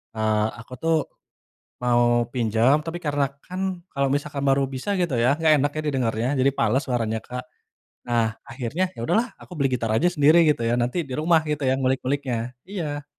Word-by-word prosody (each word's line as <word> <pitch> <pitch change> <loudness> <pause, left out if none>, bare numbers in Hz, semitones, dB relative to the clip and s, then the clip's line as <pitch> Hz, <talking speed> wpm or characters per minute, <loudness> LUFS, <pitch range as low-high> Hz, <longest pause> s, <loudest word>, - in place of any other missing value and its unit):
eee, 110 -1 +1
aku 115 +3 -11
tuh 165 0 +2 0.9
mau 120 -1 +3
pinjam, 120 +3 +3
tapi 165 +1 -4
karena 145 -2 +1 0.2
kan 185 +1 -6 0.3
kalau 140 -1 +1
misalkan 145 -1 -2
baru 135 0 +3
bisa 165 +11 -2
gitu 170 -6 0
ya, 125 +4 +4
enggak 160 0 +3
enak 145 +1 +1
ya - - 0
didengarnya. 120 -4 0
Jadi 135 +2 +4
fales 135 - +2
suaranya 115 -4 -1
Kak. 125 0 -5 0.7
Nah 120 -1 +2 0.2
akhirnya, 130 +8 -2
ya - - -7
sudah - - +2
lah 245 - -3
aku - - -14
beli 140 -1 +2
gitar 115 -2 -3
aja 155 +11 +3
sendiri 155 -1 +4
gitu 145 -6 +2
ya, 120 - +2
nanti 120 +8 -1
di - - -6
rumah 165 +1 +4
gitu 150 -1 -2
yang 130 +1 +2
ngulik-nguliknya, 130 -1 0 0.3
iya. 150 -7 -4
135 Hz, 185 wpm, -24 LUFS, 120-150 Hz, 0.9 s, ya